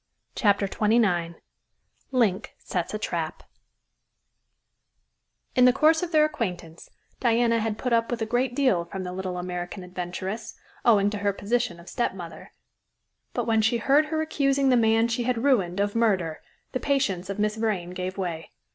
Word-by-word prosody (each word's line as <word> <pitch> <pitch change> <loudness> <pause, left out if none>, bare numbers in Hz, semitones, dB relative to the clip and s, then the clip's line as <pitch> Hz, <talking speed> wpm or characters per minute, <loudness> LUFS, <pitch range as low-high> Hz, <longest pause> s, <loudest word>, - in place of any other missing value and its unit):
CHAPTER 200 -2 +2
XXIX 195 -6 +1 0.7
LINK 225 -8 0
SETS 180 +3 -3
A - - 0
TRAP 170 -6 -3 2.1
In 250 - +6
the 250 - +7
course 310 +5 +4
of 355 -2 -3
their 305 -2 +5
acquaintance, 180 - -5 0.3
Diana 230 -1 +2
had 220 -1 -2
put 250 +1 -1
up 230 0 +2
with 240 - -2
a 220 - -1
great 245 +2 0
deal 255 -12 +2
from 190 +2 -6
the 180 0 -5
little 185 -1 -4
American 180 +1 -5
adventuress, 180 +4 -5 0.3
owing 205 -3 +4
to 210 - -4
her 200 0 +1
position 205 -3 -1
of 170 - -15
stepmother, 185 -8 -4 0.8
but - - 0
when 225 -1 +2
she 225 +2 +2
heard 280 +6 +3
her 315 0 -1
accusing 275 -3 +1
the 255 - +5
man 225 -1 +3
she 235 +1 -1
had 245 -1 0
ruined 200 -10 +2
of 205 0 0
murder, 190 -9 +1 0.3
the 255 - -2
patience 200 -11 0
of 195 - -3
Miss 210 0 0
Vrain 210 -6 -2
gave 185 +1 -5
way. 170 -4 -4
215 Hz, 165 wpm, -26 LUFS, 180-245 Hz, 2.1 s, the